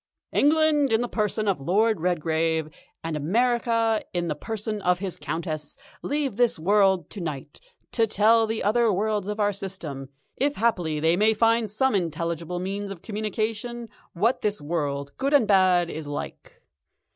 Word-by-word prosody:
"England 300 -2 +3
in 225 +1 +3
the 245 - -1
person 215 -1 -1
of 190 -8 0
Lord 210 +7 +2
Redgrave, 160 -2 0 0.3
and 165 -1 -3
America 230 - +1
in 175 -1 -1
the 150 - -1
person 215 +5 -4
of 180 -1 +2
his 190 -1 -4
Countess, 155 -2 -5 0.2
leave 285 -7 -2
this 245 -1 +2
world 190 0 +3
to 205 - -6
night 150 -5 -6 0.3
to 225 -2 +2
tell 220 +2 +4
the 220 0 -2
other 225 +2 +3
worlds 205 0 -1
of 210 +1 -4
our 205 0 +2
system, 165 -9 -6 0.3
if 285 +2 0
haply 175 -9 0
they 160 +2 +3
may 215 +3 +3
find 230 0 +2
some 265 +6 +1
intelligible 170 -1 -2
means 195 +3 -4
of 195 -4 -9
communication, 220 +2 -3 0.2
what 220 +8 +1
this 210 0 -1
world, 145 -2 -3
good 275 +2 +2
and 245 -7 +4
bad, 185 -3 +4
is 155 -1 -6
like. 145 - -7
205 Hz, 160 wpm, -25 LUFS, 170-225 Hz, 0.3 s, tell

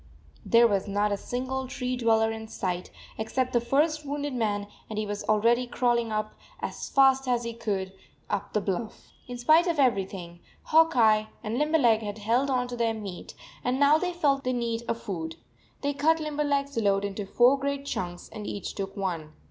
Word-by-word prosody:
There 235 0 +5
was 200 -2 0
not 205 +1 +1
a - - +2
single 260 +4 -3
tree 255 -1 -3
dweller 225 -2 +2
in 220 0 -6
sight 180 -4 -3 0.3
except 255 +4 -1
the 240 - +3
first 300 +5 +1
wounded 290 0 -3
man, 210 -4 -1 0.2
and 215 - -5
he 215 - -1
was 205 0 -4
already 235 +4 +3
crawling 240 -2 +1 0.5
as - - -5
fast 270 -1 +4
as 240 -1 +1
he 235 0 -4
could 200 -5 -3 0.3
up 200 0 -3
the 210 - +1
bluff. 205 +3 -4 0.2
In 245 0 -6
spite 310 +8 +4
of 335 -2 0
everything, 195 -9 0 0.2
Hawk 325 -2 +4
Eye 215 -2 +4 0.2
and 225 +4 -2
Limberleg 290 -8 +3
had 205 -1 -5
held 235 +6 +1
on 250 -2 +1
to 245 - -4
their 230 -1 0
meat, 200 -5 -8 0.3
and 250 +2 0
now 290 +2 +5
they 360 +1 -1
felt 285 -6 +1
the 255 - 0
need 235 -2 -1
of 230 - -1
food. 165 -8 -5 0.5
They 285 0 0
cut 315 +3 +2
Limberleg 290 -2 0
s 280 -2 -12
load 200 -2 +2
into 200 0 -4
four 245 +6 +5
great 280 0 -2
chunks, 175 -9 -4
and 215 -2 -7
each 200 - -5
took 195 0 -5
one. 170 -6 -3
235 Hz, 190 wpm, -27 LUFS, 205-270 Hz, 0.5 s, There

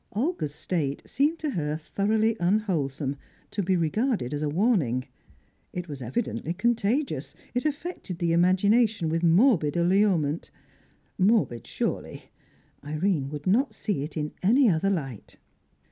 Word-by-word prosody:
Olga's 215 - -1
state 155 -3 -2
seemed 295 +5 +1
to 310 -3 -2
her 150 - -2
thoroughly 215 +7 +1
unwholesome, 165 -8 0 0.3
to 205 - -1
be 190 0 +1
regarded 175 - 0
as 145 - -2
a 150 - 0
warning; 150 - +1 0.7
it 180 0 -4
was 145 -4 -7
evidently 160 - -3
contagious; 235 +6 0 0.2
it 250 +3 -1
affected 300 - -3
the 170 -1 +1
imagination 195 +2 +3
with 165 +1 0
morbid 175 - +4
allurement. 175 -4 +2 0.7
Morbid, 190 - +2
surely; - - -4 0.5
Irene 150 -1 -1
would 150 0 -7
not 220 +4 +2
see 205 -10 -2
it 150 +1 -6
in 150 -1 -2
any 245 +8 +5
other 190 0 +2
light. 135 - -4
180 Hz, 130 wpm, -26 LUFS, 150-220 Hz, 0.7 s, any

